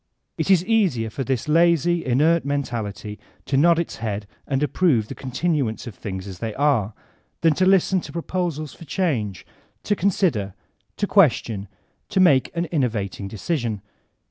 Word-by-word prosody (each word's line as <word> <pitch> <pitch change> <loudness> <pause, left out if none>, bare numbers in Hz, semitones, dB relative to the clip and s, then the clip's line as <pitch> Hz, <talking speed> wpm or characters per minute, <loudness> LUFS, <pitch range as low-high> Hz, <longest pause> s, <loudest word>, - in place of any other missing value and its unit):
It - - -2
is 185 -2 +4
easier 180 - +1
to 135 - -3
this 130 -1 -2
lazy, 170 +1 +3
inert 155 +7 +3
mentality 115 -7 -3 0.3
to 140 - -1
nod 165 +4 +5
its 170 - -3
head 105 -2 -3 0.2
and 135 0 0
approve 145 - +2
the - - -4
continuance 135 -3 -2
of 120 - -7
things 95 -1 -6
as 95 -3 -8
they 110 -2 -4
are, 130 -8 +1 0.5
than 165 -2 +4
to 185 +4 +2
listen 190 -1 +3
to - - -9
proposals 170 -3 -3
for 165 - -12
change, 130 - -2 0.4
to 205 - +1
con 195 +1 +2
sider, 110 - 0 0.4
to 205 - +1
question, 120 - +2 0.4
to 200 - 0
make 155 -8 +5
an 170 +1 0
innovating 110 - -1
decision. 110 - -3
140 Hz, 160 wpm, -23 LUFS, 110-170 Hz, 0.5 s, nod